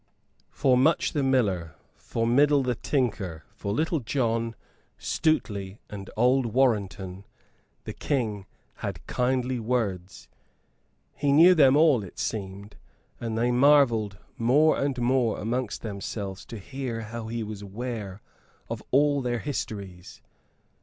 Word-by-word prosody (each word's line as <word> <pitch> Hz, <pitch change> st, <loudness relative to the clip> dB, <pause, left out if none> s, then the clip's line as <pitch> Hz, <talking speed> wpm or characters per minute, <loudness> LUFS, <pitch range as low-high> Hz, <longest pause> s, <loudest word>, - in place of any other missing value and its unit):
For 130 Hz, -2 st, +2 dB
Much 155 Hz, +6 st, +2 dB
the 145 Hz, -, 0 dB
Miller, 100 Hz, -, +1 dB, 0.2 s
for 115 Hz, -, -3 dB
Middle 140 Hz, +4 st, +4 dB
the 125 Hz, -1 st, 0 dB
Tinker, 105 Hz, -, -2 dB
for 100 Hz, -, -4 dB
Little 160 Hz, -, 0 dB
John, 115 Hz, -2 st, -1 dB, 0.4 s
Stuteley 100 Hz, -11 st, -1 dB
and 100 Hz, -2 st, -7 dB
old 125 Hz, +2 st, +3 dB
Warrenton 100 Hz, -6 st, 0 dB, 0.6 s
the -, -, -6 dB
King 110 Hz, -9 st, -2 dB, 0.3 s
had -, -, -5 dB
kindly 125 Hz, 0 st, 0 dB
words. 105 Hz, -6 st, -2 dB, 0.9 s
He 145 Hz, -1 st, 0 dB
knew 165 Hz, +6 st, +8 dB
them 140 Hz, -5 st, +5 dB
all, 150 Hz, -8 st, +4 dB
it 95 Hz, -, -11 dB
seemed; 100 Hz, 0 st, -5 dB, 0.4 s
and 115 Hz, -2 st, -3 dB
they 120 Hz, +2 st, +2 dB
marvelled 120 Hz, -6 st, +4 dB, 0.2 s
more 145 Hz, +7 st, +4 dB
and 140 Hz, -2 st, -1 dB
more 125 Hz, -1 st, +2 dB
amongst 115 Hz, -1 st, -3 dB
themselves 100 Hz, -2 st, -5 dB
to 115 Hz, -, -7 dB
hear 120 Hz, +2 st, -5 dB
how 115 Hz, +1 st, -6 dB
he 115 Hz, 0 st, -3 dB
was 105 Hz, -1 st, -7 dB
aware 105 Hz, -1 st, -6 dB, 0.5 s
of -, -, -4 dB
all 145 Hz, +1 st, +3 dB
their 120 Hz, -1 st, -1 dB
histories. 100 Hz, -9 st, -6 dB
115 Hz, 125 wpm, -26 LUFS, 100-130 Hz, 0.9 s, knew